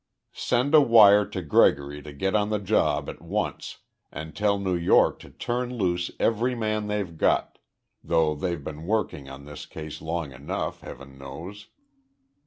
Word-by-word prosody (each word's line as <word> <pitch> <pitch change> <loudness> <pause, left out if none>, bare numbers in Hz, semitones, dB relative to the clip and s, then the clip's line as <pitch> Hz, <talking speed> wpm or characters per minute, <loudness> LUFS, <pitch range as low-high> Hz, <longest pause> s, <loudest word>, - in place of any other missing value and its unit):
"Send 125 +4 0
a 155 - +9
wire 105 -5 +7
to 95 - -5
Gregory 70 -1 +2
to 75 - -10
get 95 +7 -2
on 105 0 +2
the 105 - +1
job 95 -7 +1
at - - -8
once - - -3 0.3
and 80 0 -8
tell 105 -1 +1
New 95 -2 -1
York 85 -1 +3
to - - -13
turn 125 +1 -3
loose 90 -4 0
every 120 +3 +1
man 110 -2 -2
they've 100 -5 -3
got - - +1 0.4
though 80 -2 +2
they've 85 0 -3
been 80 +3 -7
working 100 -10 -1
on 70 +1 -10
the 75 - -10 0.2
case 80 -1 -8
long 80 -2 -3
enough, 70 +3 -4
Heaven 70 +1 -11
knows!" 85 +10 -9
90 Hz, 165 wpm, -26 LUFS, 75-105 Hz, 0.4 s, a